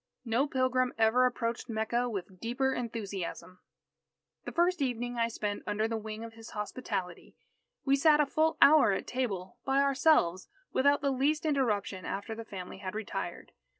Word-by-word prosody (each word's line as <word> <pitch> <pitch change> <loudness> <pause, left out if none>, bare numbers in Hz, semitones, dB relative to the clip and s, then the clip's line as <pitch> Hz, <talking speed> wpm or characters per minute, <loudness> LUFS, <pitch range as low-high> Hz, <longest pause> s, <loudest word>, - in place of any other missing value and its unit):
No 240 +5 +1
pilgrim 255 -2 +1
ever 225 +3 +4
approached 235 -1 -3
Mecca 230 +2 0
with 190 -3 -6
deeper 260 +5 0
enthusiasm. 200 -6 -5 0.9
The - - -4
first 350 -1 +2
evening 245 -2 -2
I 230 - +3
spent 210 -3 -3
under 210 +1 0
the 225 - -2
wing 220 0 -5
of 230 0 -8
his 225 0 -11
hospitality, 195 -5 -4 0.5
we 275 0 +4
sat 300 +2 +5
a 300 - +5
full 315 +3 +1
hour 285 -9 +7
at - - -3
table, 200 -8 -3
by 270 0 +2
ourselves, 270 - +3 0.2
without 285 +2 +3
the 280 -1 +1
least 290 +4 +1
interruption 215 -10 0
after 200 +3 -4
the 230 +1 -6
family 190 -3 -8
had 190 0 -6
retired. 220 -1 -5
235 Hz, 160 wpm, -30 LUFS, 210-270 Hz, 0.9 s, hour